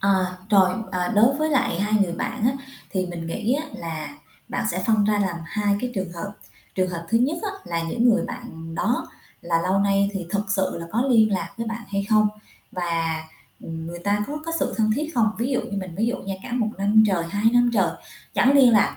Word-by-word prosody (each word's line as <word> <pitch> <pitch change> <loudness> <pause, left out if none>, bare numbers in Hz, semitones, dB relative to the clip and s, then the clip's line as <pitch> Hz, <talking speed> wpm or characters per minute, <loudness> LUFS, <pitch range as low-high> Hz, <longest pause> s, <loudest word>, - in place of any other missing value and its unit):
Ờ, 190 -2 +2
trồi, 190 -3 +6 0.2
à, 180 -1 0
đối 240 +6 +5
với 310 +1 0
lại 255 - +1
hai 210 +1 +1
người 175 -3 -1
bạn 235 +6 -3
á, 250 - +4 0.4
thì 185 -1 -1
mình 170 -2 -6
nghĩ 220 +7 -1
á, 305 +3 -2
là 165 - -6 0.3
bạn - - -2
sẽ - - -2
phân 220 -2 +4
ra 210 0 +2
làm 190 -4 0
hai 205 +3 0
cái 250 - -2
trường 190 -4 -3
hợp. 175 +4 -6 0.4
Trường 185 -1 +1
hợp 170 -1 -5
thứ 230 - +3
nhất 285 +7 +1
á, 415 - -1
là 170 -1 -2
những 230 +9 +1
người 230 - +3
bạn 165 -9 -7
đó 235 +8 0 0.3
là 165 -1 +1
lâu 190 +2 +2
nay 200 0 +2
thì 190 -4 -4
thực 200 -1 -1
sự 190 -1 0
là 170 - -6
có 230 - +2
liên 220 -3 +5
lạc 190 - -1
với 230 - -3
bạn 225 +1 -4
hay 200 0 -1
không, 215 -1 +5 0.4
và, 165 -3 -1 0.4
ừm, 160 0 -6
người 170 +1 -6
ta 205 +3 0
có 295 - -4
có 330 - -2
sự - - 0
thân 215 -1 +2
thiết 305 +3 -3
không? 225 -2 +4
Ví 240 +4 -1
dụ 260 - +1
như 200 - -6
mình 185 -3 -6
ví 220 +3 +1
dụ 240 - 0
nha, 195 0 -4
cả - - -8
một 235 -3 +1
1 205 +2 +5
trời, 185 -5 +1
2 205 +4 -3
năm 245 0 +4
trời 190 -6 +3 0.4
chẳng 260 - +4
liên 265 -3 +7
lạc 210 - +4
200 Hz, 235 wpm, -24 LUFS, 180-230 Hz, 0.4 s, liên